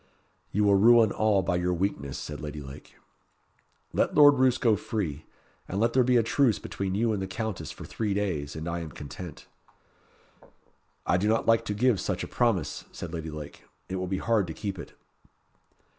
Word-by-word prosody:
"You 105 - +1
will 100 -1 +5
ruin 115 0 +6
all 105 -3 +2
by 90 0 0
your 90 0 0
weakness," 85 -7 -2
said 75 -1 -6
Lady 75 0 -6
Lake. 70 +1 -11 1.0
"Let - - +1
Lord 145 -2 +7
Roos 130 -1 +4
go 115 -3 +3
free, 90 -8 -4 0.4
and 95 - -3
let 115 +2 +2
there 130 - +5
be 125 0 +3
a 115 - +4
truce 120 -1 +2
between 95 -1 -4
you 115 +1 +1
and 100 - -2
the 95 - -3
Countess 100 -5 -4
for - - -10
three 105 -3 -2
days, 85 -9 -2
and 80 +1 -5
I 85 0 -2
am 80 -2 -6
content." 75 +2 -9 1.6
"I 90 - +3
do 100 +4 0
not 110 +1 +2
like 115 0 +3
to 105 - -2
give 120 -1 +3
such 90 0 -2
a - - -4
promise," 100 - 0
said 85 -1 -7
Lady 80 -1 -4
Lake. 75 -1 -9 0.2
"It 95 - -2
will 95 0 -3
be 95 +1 -1
hard 110 -4 +1
to 80 - -6
keep 100 -3 -4
it." - - -9
95 Hz, 195 wpm, -27 LUFS, 85-115 Hz, 1.6 s, Lord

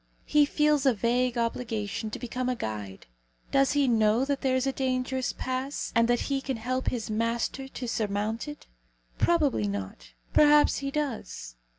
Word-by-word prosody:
He 300 -1 +4
feels 300 -2 +2
a 255 - +4
vague 240 +3 +1
obligation 225 -2 -2
to - - -5
become 250 +1 -3
a 250 - 0
guide. 105 - -6 0.5
Does 275 0 +3
he 285 -2 +3
know 225 +1 +3
that 280 -1 -1
there 260 -1 +1
is 260 +1 +1
a 270 - +1
dangerous 260 0 -1
pass, 260 +2 -3
and 230 0 +4
that 240 0 +2
he 275 -1 -1
can 265 -3 -3
help 255 +3 -2
his 230 -3 -2
master 230 +4 -1
to 255 -2 -6
surmount 215 +2 -2
it? 295 0 -8 0.5
Probably 295 - +2
not. 95 -12 -6 0.2
Perhaps 295 0 +5
he 275 0 -3
does. 235 - -4
250 Hz, 170 wpm, -28 LUFS, 220-275 Hz, 0.5 s, Perhaps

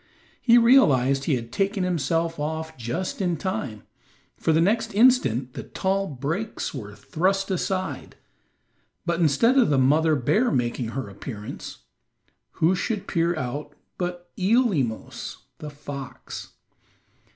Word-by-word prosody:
He 235 -1 +6
realized 140 - +5
that - - -7
he 145 - +3
had 115 -1 -5
taken 195 0 0
himself 165 -1 0
off 160 +1 -3
just 160 - -3
in 175 -3 0
time, 135 - -4 0.5
for - - 0
the 160 - +4
next 220 +5 +1
instant 135 - +4
the - - -5
tall 195 +1 -1
brakes 160 - -3
were 105 -7 -7
thrust 195 - 0
aside; 185 +1 -2 0.9
but 170 0 0
instead 180 - +4
of 245 - +4
the 145 - +3
mother 155 +4 +4
bear 210 - +2
making 120 -1 -1
her 135 - -3
appearance, 105 - -8 0.7
who 165 +4 +3
should 200 +2 -2
peer 170 0 +1
out 145 +3 -4 0.3
but 175 -1 -4
Eelemos, 185 - 0 0.2
the 150 - -6
fox. 140 -3 -8
165 Hz, 130 wpm, -25 LUFS, 135-195 Hz, 0.9 s, He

